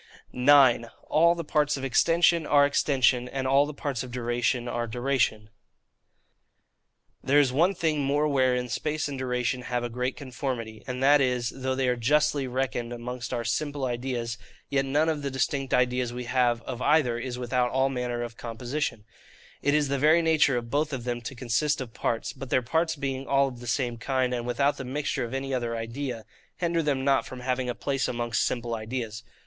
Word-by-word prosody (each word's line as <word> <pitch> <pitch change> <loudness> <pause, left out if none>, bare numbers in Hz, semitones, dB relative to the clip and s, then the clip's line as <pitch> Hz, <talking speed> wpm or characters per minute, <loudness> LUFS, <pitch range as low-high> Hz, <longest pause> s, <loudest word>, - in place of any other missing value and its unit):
9. 130 -3 +5 0.2
All 170 +2 +5
the 170 - -4
Parts 150 -1 +1
of 135 - -7
Extension 165 +5 +3
are 145 -1 +5
Extension, 130 -3 +2
and 135 0 -3
all 135 +2 +4
the - - -4
Parts 140 -4 -3
of 125 - -6
Duration 120 0 -1
are 120 -1 -2
Duration. 120 -3 0 1.7
There 140 +2 +3
is 135 -3 +3
one 175 +8 +3
thing 155 -3 0
more 145 +2 +1
wherein 130 -3 +2
space 150 +5 -2
and 145 - -5
duration 125 -1 -1
have 125 -1 -2
a 120 - -2
great 125 +2 -2
conformity, 125 -5 -5
and 125 0 -3
that 145 +1 +6
is, 125 -2 0
though 130 0 -2
they 130 -1 0
are 125 - +2
justly 145 +3 +2
reckoned 125 -2 -2
amongst 120 +1 -6
our 120 -2 -2
SIMPLE 145 +4 -2
IDEAS, 120 -2 -3 0.3
yet 135 -1 +2
none 145 +4 +2
of 155 -2 0
the 140 - -2
distinct 135 +1 -1
ideas 125 -1 +1
we 125 +1 -5
have 120 -1 +1
of 125 -1 -6
either 135 -6 +3
is 125 0 -4
without 125 0 0
all 130 +2 +1
manner 125 -2 -2
of 120 -1 -7
composition: 120 0 -4 0.6
it 145 +1 +2
is 150 -1 +2
the 140 0 -1
very 155 +4 +5
nature 155 -5 +3
of 115 -1 -5
both 150 +1 0
of 130 -3 -4
them 120 -1 -3
to 125 +3 -7
consist 130 +5 0
of 125 -4 -6
parts: 115 - -2
but 135 -2 -8
their 125 - +2
parts 160 +6 0
being 135 -2 -4
all 140 0 +3
of 125 -3 -8
the 120 - -9
same 120 -2 -1
kind, 130 0 0
and 120 -1 -3
without 140 +4 +1
the - - -5
mixture 135 0 -2
of 120 +2 -4
any 135 0 -3
other 120 -2 -1
idea, 115 0 -5 0.3
hinder 170 -1 0
them 140 -3 -1
not 135 -1 +3
from 130 -1 -9
having 125 0 -1
a 120 - -2
place 135 -1 -1
amongst 120 -1 -1
simple 120 -1 -2
ideas. 110 -1 -4
130 Hz, 200 wpm, -27 LUFS, 120-140 Hz, 1.7 s, that